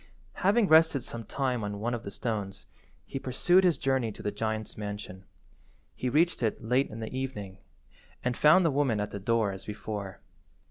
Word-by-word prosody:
Having 205 +3 +4
rested 160 -5 +5
some 115 -1 -6
time 125 -1 -1
on 105 0 -4
one 120 +3 -1
of 120 - -3
the 100 - -7
stones, 100 -2 -4 0.4
he 135 - -5
pursued 175 +9 +3
his 175 -3 +3
journey 130 -4 0
to - - -10
the 105 - -1
giant's 110 +1 -3
mansion. 100 -2 -7 0.7
He 125 - -2
reached 165 +5 +2
it 110 -3 0
late 125 +5 +2
in 110 +1 -8
the 110 +3 -5
evening, 105 -8 -5 0.6
and 125 -1 0
found 155 +7 +6
the 165 - +3
woman 135 -6 +1
at 105 - -3
the 100 - -5
door 110 0 +1
as 95 0 -8
before. 105 -2 -6
115 Hz, 185 wpm, -29 LUFS, 105-135 Hz, 0.7 s, found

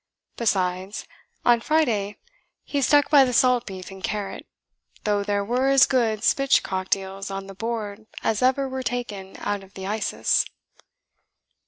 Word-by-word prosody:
Besides, 190 -3 -1 0.4
on 240 -1 +5
Friday 230 -11 +1 0.5
he 285 - -2
stuck 290 +2 +4
by 285 -3 +8
the 250 -1 0
salt 250 0 +3
beef 190 -1 -8
and 190 0 -11
carrot, 205 -2 -4 0.6
though 205 -1 +1
there 200 0 -1
were 250 +5 +1
as 275 -1 +6
good 230 -5 +1
spitch 275 +3 +3
cocked 185 0 0
eels 195 0 -7
on 195 0 -5
the 195 - -9
board 220 0 -5 0.2
as 220 -2 0
ever 265 +2 +2
were 260 0 -4
ta'en 215 -7 -4
out 205 -1 -2
of 195 0 -18
the 190 - -6
Isis." 210 +2 +1
215 Hz, 155 wpm, -24 LUFS, 195-250 Hz, 0.6 s, by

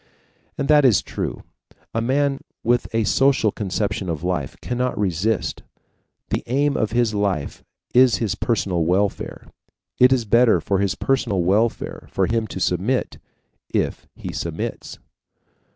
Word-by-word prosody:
And 140 - -1
that 150 0 +6
is 120 -8 +4
true. - - -5 0.5
A 115 - 0
man 135 +3 +1 0.2
with 120 +1 +1
the 115 0 +1
social 135 -2 +3
conception 100 -1 -2
of 80 -1 -3
life 90 -6 -2
cannot 125 +1 -2
resist. 100 +1 -1 0.7
The - - -1
aim 140 +4 +1
of 110 - 0
his 120 -1 +1
life 100 -8 -2 0.3
is 125 -2 +6
his 105 -1 -1
personal 95 -7 0
welfare. 95 +4 -1 0.5
It 125 +1 +7
is 125 -3 +2
better 115 +2 +4
for 100 -1 0
his 100 -2 0
personal 120 -9 0
welfare 105 +6 0
for 95 - +1
him 115 +2 0
to 95 - -6
submit, 95 +9 0 0.6
and - - +1 0.2
he - - -7
submits. - - -5
110 Hz, 140 wpm, -22 LUFS, 95-125 Hz, 0.7 s, It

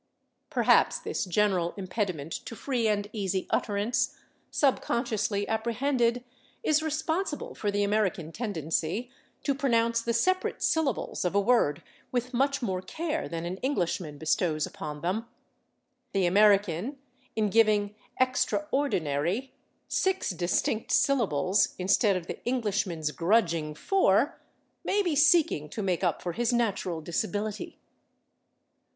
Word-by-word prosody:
Perhaps - - +4
this - - -3
general 185 -2 +1
impediment 185 -6 -3
to 230 - -6
free 245 -2 -1
and 205 -1 0
easy 195 -3 -1
utterance, 210 +3 0 0.3
subconsciously 225 -6 0
apprehended, 235 +2 0 0.4
is 310 -6 +3
responsible 315 +1 -2
for 210 - -2
the 205 0 +1
American 200 -6 0
tendency 200 - -2 0.3
to 280 - +1
pronounce 235 -4 +1
the 235 - -1
separate 370 +11 +1
syllables 305 -8 0
of 180 +2 -1
a - - +5
word 195 -9 +2 0.3
with 250 +1 -2
much 275 +2 +1
more 190 -5 -1
care 320 - -3
than 165 0 -4
an 180 +2 -4
Englishman 175 - -2
bestows 155 0 0
upon 150 -1 -7
them; 200 +7 -2 0.9
the 195 -2 +2
American, 200 - +3 0.4
in 215 -2 +1
giving 210 -2 +3 0.3
/extraordinary/ 255 - 0 0.4
six 380 - 0
distinct 180 +5 -1
syllables 220 - +2
instead 195 +2 +3
of 180 -2 -3
the - - -7
Englishman's 200 -10 -1
grudging 165 - +1
four, 285 - +2 0.4
may 410 +1 +1
be 340 -5 0
seeking 295 - +4
to 215 - -4
make 185 -1 0
up 175 -3 0
for 175 - -2
his 235 +6 0
natural 200 -8 0
disability. 210 +5 -3
210 Hz, 120 wpm, -28 LUFS, 180-250 Hz, 0.9 s, a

